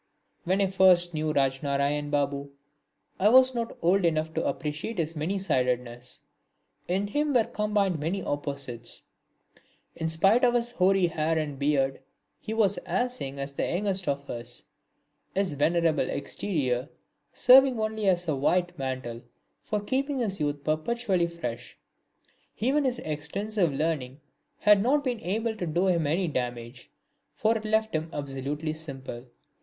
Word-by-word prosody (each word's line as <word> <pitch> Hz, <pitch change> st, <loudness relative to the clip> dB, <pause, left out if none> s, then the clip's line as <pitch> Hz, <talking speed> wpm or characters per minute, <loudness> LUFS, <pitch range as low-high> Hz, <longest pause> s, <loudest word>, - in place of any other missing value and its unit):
When 190 Hz, +3 st, +2 dB
I -, -, +4 dB
first 185 Hz, -2 st, +4 dB
knew 155 Hz, 0 st, -1 dB
Rajnarain 140 Hz, +1 st, 0 dB
Babu, 140 Hz, -1 st, -1 dB, 0.7 s
I 205 Hz, -, +5 dB
was 260 Hz, +2 st, +6 dB
not 235 Hz, -1 st, -3 dB
old 185 Hz, +3 st, +3 dB
enough 160 Hz, -1 st, +1 dB
to -, -, -1 dB
appreciate 155 Hz, +8 st, -3 dB
his 165 Hz, -1 st, -2 dB
many 160 Hz, +6 st, -1 dB
sidedness. 125 Hz, -7 st, -2 dB, 0.6 s
In 190 Hz, +3 st, 0 dB
him 290 Hz, +7 st, 0 dB
were 235 Hz, -, +6 dB
combined 210 Hz, -6 st, 0 dB
many 175 Hz, +6 st, -2 dB
opposites. 140 Hz, -4 st, -4 dB, 0.9 s
In 160 Hz, -, -2 dB
spite 195 Hz, +9 st, +4 dB
of 245 Hz, -1 st, +4 dB
his 240 Hz, 0 st, +1 dB
hoary 190 Hz, -4 st, +3 dB
hair 160 Hz, -1 st, 0 dB
and 145 Hz, -3 st, -3 dB
beard 135 Hz, -2 st, +1 dB, 0.4 s
he -, -, -7 dB
was 215 Hz, -3 st, +2 dB
as 250 Hz, 0 st, -2 dB
young 135 Hz, +1 st, -5 dB
as 140 Hz, 0 st, -5 dB
the -, -, -3 dB
youngest 190 Hz, 0 st, -1 dB
of 140 Hz, 0 st, -2 dB
us, 120 Hz, 0 st, -6 dB, 0.7 s
his 190 Hz, -4 st, +1 dB
venerable 160 Hz, +2 st, +2 dB
exterior 140 Hz, -7 st, -2 dB, 0.4 s
serving 255 Hz, -1 st, +6 dB
only 215 Hz, -1 st, -1 dB
as 180 Hz, -1 st, +1 dB
a 155 Hz, -, +1 dB
white 175 Hz, +5 st, 0 dB
mantle 130 Hz, -3 st, -4 dB, 0.4 s
for 210 Hz, -, -2 dB
keeping 270 Hz, +6 st, -1 dB
his 195 Hz, -5 st, -2 dB
youth 145 Hz, -1 st, -2 dB
perpetually 185 Hz, +4 st, 0 dB
fresh. 120 Hz, -, -6 dB, 0.8 s
Even 275 Hz, +6 st, +1 dB
his 255 Hz, -2 st, 0 dB
extensive 180 Hz, +5 st, -2 dB
learning 140 Hz, -3 st, -2 dB, 0.4 s
had 210 Hz, -1 st, +6 dB
not 280 Hz, +6 st, +2 dB
been 250 Hz, -4 st, -1 dB
able 220 Hz, +3 st, -2 dB
to 180 Hz, -, -3 dB
do 170 Hz, +4 st, +1 dB
him 170 Hz, -5 st, +2 dB
any 175 Hz, +5 st, +1 dB
damage, 120 Hz, -3 st, -4 dB, 0.5 s
for 220 Hz, +2 st, +2 dB
it 220 Hz, -1 st, -4 dB
left 220 Hz, 0 st, +1 dB
him 160 Hz, +1 st, -2 dB
absolutely 145 Hz, +2 st, -3 dB
simple. 135 Hz, -6 st, -7 dB
170 Hz, 150 wpm, -27 LUFS, 140-210 Hz, 0.9 s, was